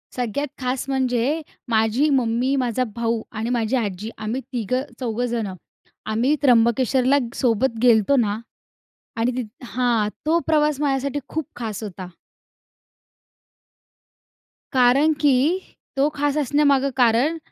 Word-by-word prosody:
सगळ्यात 250 Hz, +4 st, -2 dB
खास 255 Hz, +1 st, -2 dB
म्हणजे 260 Hz, +3 st, 0 dB, 0.3 s
माझी 225 Hz, +6 st, +2 dB
मम्मी, 255 Hz, 0 st, +1 dB
माझा 255 Hz, -1 st, 0 dB
भाऊ 230 Hz, -1 st, -1 dB
आणि 225 Hz, +2 st, -3 dB
माझी 235 Hz, 0 st, 0 dB
आजी 210 Hz, -2 st, -3 dB
आम्ही 220 Hz, +4 st, -3 dB
तिघं-चौघं 245 Hz, 0 st, -2 dB
जणं. 230 Hz, -5 st, -3 dB, 0.5 s
आम्ही 235 Hz, +7 st, +1 dB
त्र्यंबकेश्वरला 255 Hz, +1 st, +3 dB, 0.2 s
सोबत 235 Hz, 0 st, +1 dB
गेलो 235 Hz, -3 st, +7 dB
होतो 245 Hz, +7 st, +1 dB
ना 210 Hz, 0 st, -1 dB, 0.8 s
आणि 235 Hz, +2 st, +1 dB
तिथ 245 Hz, +2 st, -7 dB
हां, 235 Hz, -4 st, 0 dB, 0.2 s
तो 325 Hz, +2 st, +3 dB
प्रवास 300 Hz, -2 st, +2 dB
माझ्यासाठी 280 Hz, 0 st, 0 dB
खूप 315 Hz, -3 st, -3 dB
खास 220 Hz, -2 st, -5 dB
होता. 185 Hz, -3 st, -7 dB, 2.7 s
कारण 260 Hz, +5 st, +4 dB
की 280 Hz, -4 st, +4 dB, 0.6 s
तो 280 Hz, +2 st, +4 dB
खास 290 Hz, 0 st, 0 dB
असण्यामागे 285 Hz, -1 st, +2 dB
कारण, 250 Hz, +7 st, +3 dB
250 Hz, 115 wpm, -22 LUFS, 225-275 Hz, 2.7 s, गेलो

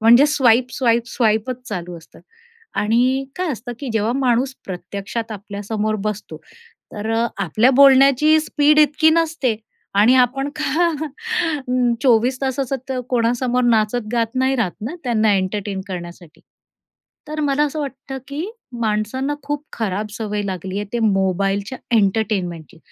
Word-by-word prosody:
म्हणजे 240 Hz, +6 st, +7 dB
swipe, 250 Hz, -4 st, +3 dB
swipe, 235 Hz, -2 st, +2 dB
स्वाईपचं 235 Hz, +2 st, 0 dB
चालू 180 Hz, -5 st, -5 dB
असतं. 160 Hz, -, -18 dB, 0.6 s
आणि 250 Hz, +5 st, +2 dB
काय 365 Hz, -1 st, -1 dB
असतं, 245 Hz, 0 st, -6 dB
की 275 Hz, -, -4 dB
जेव्हा 220 Hz, +1 st, +1 dB
माणूस 260 Hz, 0 st, +1 dB
प्रत्यक्षात 200 Hz, +5 st, -5 dB
आपल्यासमोर 210 Hz, +1 st, -3 dB
बसतो. 210 Hz, -6 st, -4 dB, 0.6 s
तर 215 Hz, +2 st, -4 dB, 0.3 s
आपल्या 215 Hz, -, +3 dB
बोलण्याची 275 Hz, +3 st, +6 dB
स्पीड 300 Hz, -1 st, +2 dB
इतकी 305 Hz, +1 st, +5 dB
नसते. 320 Hz, -8 st, +1 dB, 0.4 s
आणि 215 Hz, +5 st, +5 dB
आपण 260 Hz, +2 st, +2 dB
का 340 Hz, +1 st, +1 dB, 1.1 s
24 250 Hz, 0 st, +3 dB
तासाचा 270 Hz, 0 st, -1 dB
त 265 Hz, -, -2 dB, 0.2 s
कोणासमोर 245 Hz, +1 st, +1 dB
नाचत 225 Hz, -1 st, +2 dB
गात 230 Hz, 0 st, 0 dB
नाही 260 Hz, +1 st, +1 dB
राहत 205 Hz, -7 st, 0 dB
ना, 250 Hz, +11 st, -4 dB
त्यांना 220 Hz, -3 st, +2 dB
एंटरटेन 195 Hz, +1 st, -2 dB
करण्यासाठी. 175 Hz, -3 st, -8 dB, 0.9 s
तर 305 Hz, 0 st, -4 dB
मला 290 Hz, 0 st, +1 dB
असं 300 Hz, +1 st, -3 dB
वाटतं, 270 Hz, -1 st, -6 dB
की 305 Hz, +8 st, -4 dB, 0.3 s
माणसांना 220 Hz, +7 st, -1 dB
खूप 290 Hz, 0 st, -3 dB
खराब 210 Hz, -1 st, -2 dB
सवय 210 Hz, -2 st, -2 dB
लागली 190 Hz, 0 st, -4 dB
आहे. 205 Hz, -, -4 dB
ते 240 Hz, -, -1 dB
मोबाईलच्या 195 Hz, +3 st, 0 dB, 0.2 s
एंटरटेनमेंटची 190 Hz, -6 st, -1 dB
235 Hz, 130 wpm, -20 LUFS, 205-270 Hz, 1.1 s, म्हणजे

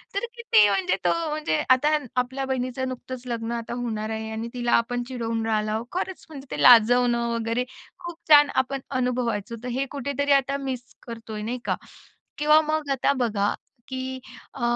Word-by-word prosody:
तर 400 Hz, -, 0 dB
किती 340 Hz, -, +5 dB
म्हणजे 190 Hz, -1 st, +1 dB
तो -, -, +4 dB, 0.2 s
म्हणजे 300 Hz, -, -1 dB
आता 295 Hz, +4 st, +4 dB, 0.3 s
आपल्या 260 Hz, +2 st, -4 dB
बहिणीचं 260 Hz, 0 st, -2 dB
नुकतंच 255 Hz, 0 st, -7 dB
लग्न 230 Hz, -1 st, -3 dB
आता 230 Hz, 0 st, -5 dB
होणार 220 Hz, -2 st, -3 dB
आहे 220 Hz, 0 st, -4 dB
आणि 225 Hz, +1 st, -4 dB
तिला 240 Hz, -1 st, -1 dB
आपण 245 Hz, 0 st, -3 dB
चिडवून 230 Hz, -3 st, -3 dB
राहिलो. 215 Hz, 0 st, 0 dB
खरंच 375 Hz, +1 st, -4 dB
म्हणजे 275 Hz, -3 st, -10 dB
ते -, -, -3 dB
लाजवणं 240 Hz, 0 st, +6 dB
वगैरे 230 Hz, +2 st, -1 dB, 0.3 s
खूप 345 Hz, -2 st, -7 dB
छान 290 Hz, -1 st, +8 dB
आपण 270 Hz, +1 st, 0 dB, 0.2 s
अनुभवायचो. 235 Hz, -3 st, -1 dB
तर 250 Hz, -, -5 dB
हे 260 Hz, +3 st, -1 dB
कुठेतरी 280 Hz, +1 st, -2 dB
आता 275 Hz, +1 st, -3 dB
मिस 265 Hz, -3 st, -4 dB, 0.3 s
करतोय 225 Hz, -2 st, -7 dB
नाही 240 Hz, +3 st, -3 dB
का? -, -, +1 dB, 0.6 s
किंवा 300 Hz, +1 st, +5 dB
मग 310 Hz, -2 st, -1 dB
आता 270 Hz, +1 st, +2 dB
बघा 205 Hz, -3 st, 0 dB, 0.3 s
की 260 Hz, 0 st, -4 dB, 0.4 s
अ, 265 Hz, -, -8 dB
250 Hz, 165 wpm, -25 LUFS, 225-275 Hz, 0.6 s, छान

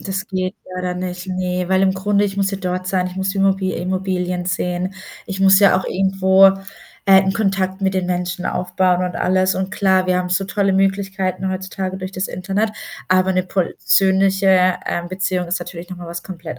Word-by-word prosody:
das 190 Hz, -1 st, -4 dB
geht 185 Hz, +1 st, -3 dB, 0.2 s
leider 180 Hz, 0 st, -3 dB
nicht. 180 Hz, 0 st, -5 dB
Ne, 180 Hz, -1 st, -2 dB
weil 190 Hz, 0 st, +3 dB
im 190 Hz, -1 st, +3 dB
Grunde, 200 Hz, +2 st, +1 dB
ich 195 Hz, -1 st, -3 dB
muss 195 Hz, -1 st, +1 dB
ja 195 Hz, -, -4 dB
dort 185 Hz, -1 st, -3 dB
sein. 185 Hz, -1 st, 0 dB
Ich 185 Hz, -, -8 dB
muss 190 Hz, 0 st, -1 dB
die 195 Hz, -, -6 dB
Immobi 195 Hz, -1 st, +1 dB
Immobilien 180 Hz, 0 st, -2 dB
sehen. 180 Hz, +1 st, -2 dB, 0.3 s
Ich 195 Hz, 0 st, -5 dB
muss 195 Hz, 0 st, +6 dB
ja 200 Hz, -2 st, +5 dB
auch 190 Hz, -, -5 dB
irgendwo, 190 Hz, 0 st, +4 dB, 0.6 s
äh, 190 Hz, -1 st, +7 dB
'n 190 Hz, -, 0 dB
Kontakt 195 Hz, -2 st, -1 dB
mit 190 Hz, -1 st, 0 dB
den 185 Hz, -1 st, 0 dB
Menschen 180 Hz, +1 st, -2 dB
aufbauen 180 Hz, 0 st, 0 dB
und 180 Hz, -, -4 dB
alles. 185 Hz, +1 st, +1 dB
Und 190 Hz, 0 st, -3 dB
klar, 190 Hz, -2 st, +2 dB
wir 180 Hz, 0 st, +2 dB
haben 180 Hz, 0 st, -2 dB
so 195 Hz, +2 st, +1 dB
tolle 195 Hz, 0 st, 0 dB
Möglichkeiten 195 Hz, -1 st, 0 dB
heutzutage 190 Hz, 0 st, -4 dB
durch 185 Hz, 0 st, -6 dB
das 185 Hz, 0 st, -2 dB
Internet, 200 Hz, +4 st, -2 dB, 0.4 s
aber 185 Hz, +1 st, +3 dB
'ne 185 Hz, -1 st, 0 dB
persönliche, 190 Hz, 0 st, +2 dB
ähm, 175 Hz, 0 st, -3 dB
Beziehung 185 Hz, -1 st, -2 dB
ist 175 Hz, +2 st, -1 dB
natürlich 175 Hz, 0 st, -8 dB
noch 185 Hz, -, -6 dB
mal 175 Hz, -1 st, -9 dB
was 170 Hz, 0 st, -6 dB
komplett 170 Hz, -7 st, -8 dB
185 Hz, 200 wpm, -19 LUFS, 180-195 Hz, 0.6 s, äh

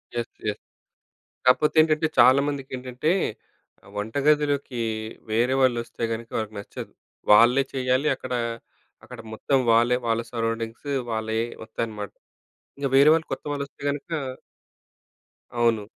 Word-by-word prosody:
Yes, 120 Hz, 0 st, -3 dB, 0.2 s
yes. 105 Hz, 0 st, -2 dB, 0.9 s
కాపోతే 125 Hz, +4 st, +4 dB
ఏంటంటే, 155 Hz, 0 st, +1 dB
చాలామందికి 135 Hz, +2 st, +4 dB
ఏంటంటే 125 Hz, +5 st, -1 dB, 0.7 s
ఆహ్, -, -, -16 dB
వంటగదిలోకి 140 Hz, +3 st, +1 dB, 0.5 s
వేరే 120 Hz, +4 st, +2 dB
వాలోస్తే 120 Hz, -3 st, 0 dB
గనుక 115 Hz, 0 st, -5 dB
వాళ్ళకి 110 Hz, -1 st, -3 dB
నచ్చదు. 100 Hz, -, -8 dB, 0.4 s
వాళ్ళే 120 Hz, +6 st, +7 dB
చెయ్యాలి 130 Hz, +2 st, +1 dB
అక్కడ, 130 Hz, -1 st, -7 dB, 0.7 s
అక్కడ -, -, -10 dB
మొత్తం 135 Hz, +5 st, +1 dB
వాళ్ళే, 120 Hz, +2 st, +4 dB
వాళ్ళ 115 Hz, 0 st, +1 dB
సరౌండింగ్స్ 115 Hz, +2 st, -3 dB, 0.2 s
వాళ్ళే 110 Hz, 0 st, -1 dB, 0.3 s
వస్తాయన్నమాట. 110 Hz, -2 st, -5 dB, 0.7 s
ఇంక 140 Hz, -, -2 dB
వేరే 140 Hz, +2 st, +7 dB
వాళ్ళు 160 Hz, 0 st, 0 dB
కొత్త -, -, -4 dB
వాళ్ళొస్తే 140 Hz, -1 st, -6 dB
గనక 145 Hz, +4 st, -6 dB, 1.4 s
అవును. 115 Hz, -3 st, +1 dB
125 Hz, 115 wpm, -25 LUFS, 115-140 Hz, 1.4 s, వాళ్ళే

